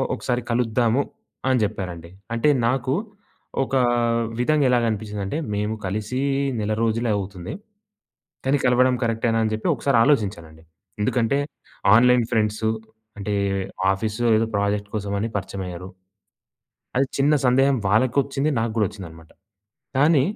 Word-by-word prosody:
ఒకసారి 125 -1 -2
కలుద్దాము" 120 +2 +2 0.5
అని 130 -1 +3
జెప్పారండి. 90 -5 -4 0.2
అంటే, 130 +6 +3 0.2
నాకు 130 +2 0 0.7
ఒకా 130 0 +1 0.6
విధంగా 145 +1 +3
ఎలాగనిపించిందంటే, 110 0 -1 0.2
మేము 105 +2 -1
కలిసి 110 +7 -2 0.4
నెల 105 +1 -1
రోజులే 115 +1 +1
అవుతుంది. 95 -2 -6 0.9
కానీ, 140 +2 +3
కలవడం 125 +1 +4
కరెక్టేనా 115 0 +1
అని 110 - -1
జెప్పి 110 - -1
ఒకసారి 140 -4 +2
ఆలోజించానండి. 95 - -1 0.4
ఎందుకంటే, 120 +4 +1 0.6
ఆన్‌లైన్ 125 0 +5
ఫ్రెండ్స్ 110 -1 0 0.5
అంటే, 105 +1 -2 0.6
ఆఫీస్‌లో 110 +4 -1
ఏదో 110 0 0
ప్రాజెక్ట్ 100 0 -1
కోసమని 100 +1 -2
పరిచయమయ్యారు. 90 -2 -6 1.1
అది 135 - +3
చిన్న 145 +2 +4
సందేహం 135 +2 +4
వాళ్ళకొచ్చింది, 135 +7 +2
నాకు 115 0 -1
గూడా 110 -2 +3
ఒచ్చిందనమాట. 80 -5 -11 0.7
కానీ, 145 +1 +5
115 Hz, 110 wpm, -23 LUFS, 100-125 Hz, 1.1 s, ఆన్‌లైన్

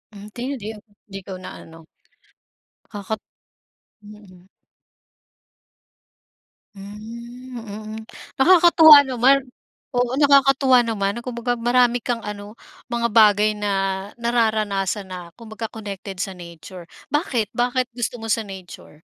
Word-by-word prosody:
Hindi 210 +4 -10 0.2
di 205 - -6 0.5
di 195 - -5
ko 195 - -9
na-ano, 165 -3 -11 1.0
nakaka 205 0 -6 0.9
mm. 205 -4 -15 2.3
Hmm, 235 +5 -10
mm. 215 -1 -8 0.4
Nakakatuwa 320 -1 +8
naman 265 +1 +3 0.5
oo 245 -1 -1
nakakatuwa 275 -3 +5
naman 200 -1 -2
na 235 - -8
kumbaga 245 0 -2
marami 240 +1 +3
kang 240 0 -3
ano, 210 0 -8 0.4
mga 235 0 0
bagay 210 -1 +4
na 205 -1 -2 0.5
nararanasan 215 -4 0
na 175 -2 -9
kumbaga 225 +1 -8
connected 200 -4 -7
sa 190 -2 -5
nature, 170 +1 -11 0.2
bakit 265 - -1
bakit 250 +1 0
gusto 240 0 -3
mo 225 - -6
sa 220 0 0
nature? 185 -5 -12
220 Hz, 105 wpm, -21 LUFS, 200-245 Hz, 2.3 s, Nakakatuwa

